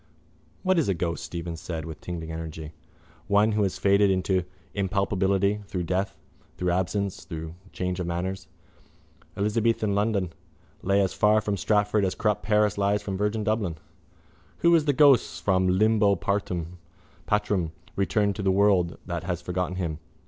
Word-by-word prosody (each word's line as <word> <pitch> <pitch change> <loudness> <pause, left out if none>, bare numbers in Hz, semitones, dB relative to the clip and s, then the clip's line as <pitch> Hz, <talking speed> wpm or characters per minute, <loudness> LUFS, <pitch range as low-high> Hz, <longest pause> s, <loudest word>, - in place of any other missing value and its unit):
—What 185 -2 +3
is 150 - +1
a 95 - +2
ghost? 85 0 -2
Stephen 85 -1 -5
said 80 -1 -5
with 80 -2 -8
tingling 80 -2 -5
energy. 80 -1 -6 0.6
One 105 +2 +4
who 105 0 +1
has 95 -2 0
faded 100 0 +4
into 95 -1 +1 0.3
impalpability 100 +1 +1
through 90 -3 -3
death, 95 +3 -2 0.4
through 90 -1 0
absence, 95 +2 -1
through 80 0 -6 0.2
change 90 0 -3
of 90 - -2
manners. 90 +2 -3 0.9
Elizabethan 105 +1 +1
London 100 -4 0 0.5
lay 100 +1 +2
as 95 - 0
far 105 +1 +4
from 105 -1 -1
Stratford 105 +1 +1
as 95 - 0
corrupt 105 -3 0
Paris 105 -1 +2
lies 100 +1 +1
from 95 - -3
virgin 105 +2 -1
Dublin. 105 -6 0 0.9
Who 170 0 +5
is 160 -3 +4
the 145 - +3
ghost 125 - +4
from 95 -1 +2
limbo 105 +2 +3
patrum, 90 -3 -2 1.2
returning 100 +1 +1
to 100 - -5
the 95 -1 +2
world 95 -3 +3
that 85 -2 -4
has 90 -2 -2
forgotten 90 0 -3
him? 85 -4 -3
95 Hz, 155 wpm, -26 LUFS, 90-105 Hz, 1.2 s, Who